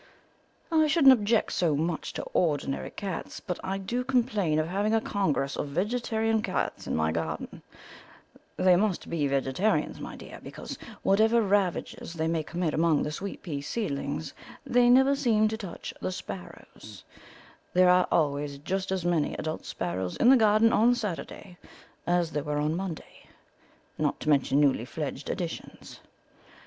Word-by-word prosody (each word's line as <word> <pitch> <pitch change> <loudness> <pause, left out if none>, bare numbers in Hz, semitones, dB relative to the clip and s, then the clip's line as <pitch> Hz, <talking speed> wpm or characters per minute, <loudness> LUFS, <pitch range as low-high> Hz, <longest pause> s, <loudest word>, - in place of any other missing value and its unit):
I 315 -1 +4
shouldn't 295 -4 +7
object 220 -1 +1
so 165 -5 +2
much 160 +2 -2
to - - -4
ordinary 145 -5 0
cats, 195 -5 -5
but 180 - -5
I 190 +1 -2
do 235 +6 -2
complain 230 -11 +1
of 155 0 +1
having 205 +5 0
a - - +4
congress 155 -11 -1
of - - -3
vegetarian 220 +6 0
cats 185 -4 -3
in - - -1
my 80 0 +1
garden; 80 0 -4 1.0
they 185 -1 +5
must 195 0 0
be 155 -4 0
vegetarians, 140 +9 0
my - - -7
dear, - - -10
because, - - -8 0.3
whatever 220 +4 +4
ravages 195 -4 -1
they 160 -1 -1
may 165 -1 0
commit 170 +1 -2
among 160 -1 +2
the 150 - -3
sweet 195 +6 -6
pea 145 -6 -4
seedlings, 145 -4 -3 0.3
they 245 -2 +4
never 265 +3 +6
seem 225 -6 +2
to 220 - -2
touch 200 -6 -7
the - - -2
sparrows; 100 - -9 0.7
there 185 0 +5
are 180 0 +4
always 145 -2 0
just 190 +6 -3
as 185 -2 -1
many 170 -4 +1
adult 155 0 -4
sparrows 95 - -3
in 240 - +5
the - - +8
garden 220 -1 +4
on 240 +3 +4
Saturday 190 -4 -6 0.5
as 175 -2 +1
there 150 -2 -2
were 150 0 -2
on 150 +2 0
Monday, 180 -3 -7 0.7
not - - 0
to - - -3
mention 140 -1 +3
newly 140 -5 +3
fledged 135 +2 -5
additions. 175 -3 -6
180 Hz, 155 wpm, -28 LUFS, 150-215 Hz, 1.0 s, the